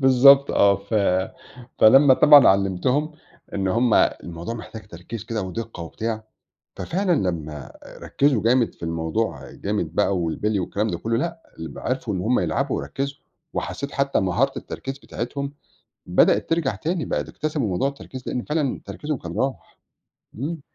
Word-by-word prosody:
بالضبط 135 +1 +7
آه، 100 -1 +4
ف 100 +3 -7 0.8
فلمّا 130 +4 +7
طبعًا 145 0 +8
علّمتهم، 100 - +1 0.4
إن 95 -1 0
هُم 115 +4 +2
الموضوع 85 +6 0
محتاج 110 -2 -9
تركيز 100 +6 -8
كده 110 -3 -3
ودِقّة 100 0 -6
وبتاع، 110 +7 -4 0.5
ففعلًا 175 - 0 0.2
لمّا 75 -4 -6 0.3
ركّزوا 135 -7 +1
جامد 120 +1 +3
في - - -14
الموضوع 80 -2 -2
جامد - - -3
بقى 100 - +2
والبِلي 95 +5 -1
والكلام 100 +4 -1
ده 90 -5 -2
كلّه، 115 +5 -1
لأ 165 +4 -3 0.2
ال 80 - -5
ب - - -10
عرفوا 125 -4 -2
إن 90 - -2
هُم 120 +6 +2
يلعبوا 135 +2 -1
ويركّزوا، 140 +1 -4 0.4
وحسّيت 140 +1 -4
حتّى 140 0 +1
مهارة 95 +9 +1
التركيز 135 +1 -6
بتاعتهم 140 +4 -5 0.5
بدأت - - +3
ترجع 165 -5 0
تاني، 165 +1 -2
بقى - - -1
د - - -13
اكتسبوا 150 -6 -2
موضوع 95 +8 0
التركيز 135 -2 -8
لإن 125 - -2
فعلًا 150 -3 -1
تركيزهم 150 -1 -4
كان 85 -3 -7
راح، 135 +1 -3 0.6
إمم. 150 +7 -4
115 Hz, 155 wpm, -23 LUFS, 95-140 Hz, 0.8 s, طبعًا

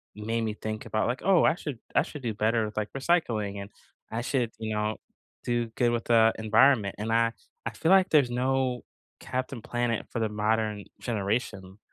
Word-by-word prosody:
made 115 +2 -2
me 110 -1 -1
think 110 0 -5
about, 110 - 0
like, 125 +2 -2
"Oh, 195 -3 +5
I - - +4
should 145 -8 -6 0.2
I - - +6
should 150 - -7
do 115 -3 -2
better 110 +2 +1
with, 105 - -7
like, 105 -1 -2
recycling, 120 - 0
and 100 - -8 0.4
I 110 - -2
should," 125 -2 0
you 110 -1 -3
know, 105 +1 -1 0.5
"do 120 -1 0
good 120 -1 +2
with 120 -1 -1
the 115 -1 +5
environment." 110 -1 +4
And 110 +3 -2
I 115 0 +3 0.3
I - - 0
feel 135 - 0
like 190 -1 +5
there's 145 -5 +4
no 125 0 0 0.4
Captain 130 -1 -4
Planet 120 0 -1
for - - -3
the 110 - +1
modern 105 0 0 0.2
generation 100 -3 -3
115 Hz, 190 wpm, -28 LUFS, 110-125 Hz, 0.5 s, I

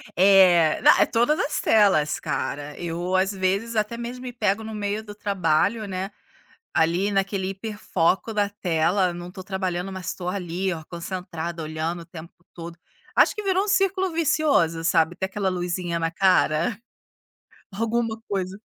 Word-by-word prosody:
É, 180 -4 +5
na - - +6
é - - +6
todas 240 +7 +1
as 295 - -1
telas, 190 -9 +3
cara. 145 +1 -4
Eu, 175 +2 -2
às 190 +1 +2
vezes, 195 +4 -1
até 215 +2 -1
mesmo 240 +2 -6
me 250 - -5
pego 215 -2 0
no 220 0 -7
meio 210 0 -3
do 210 -1 -9
trabalho, 200 +2 0
né. 190 +1 -4 0.6
Ali 175 +5 +2
naquele 195 -1 -1
hiperfoco 195 -1 -1
da 205 -1 +1
tela, 180 -1 +1
não 175 0 -7
estou 185 +1 -9
trabalhando 185 -1 -3
mas 190 -2 -6
estou 180 -1 -5
ali 185 0 -2
ó 160 -2 -6
concentrada, 170 -1 -5
olhando 160 +2 -3
o - - -12
tempo 165 0 -11 0.2
todo. 170 0 -9 0.4
Acho - - +5
que 425 - -5
virou 385 -1 +1
um - - -6
círculo 380 -1 +1
vicioso, 295 - +1
sabe, 165 0 +2
até 190 +1 -2
aquela 195 0 -2
luzinha 175 -1 -2
na 165 0 -1
cara. 180 +2 +2 0.9
Alguma 225 +2 -1
coisa 190 -1 -3
190 Hz, 160 wpm, -24 LUFS, 170-215 Hz, 0.9 s, na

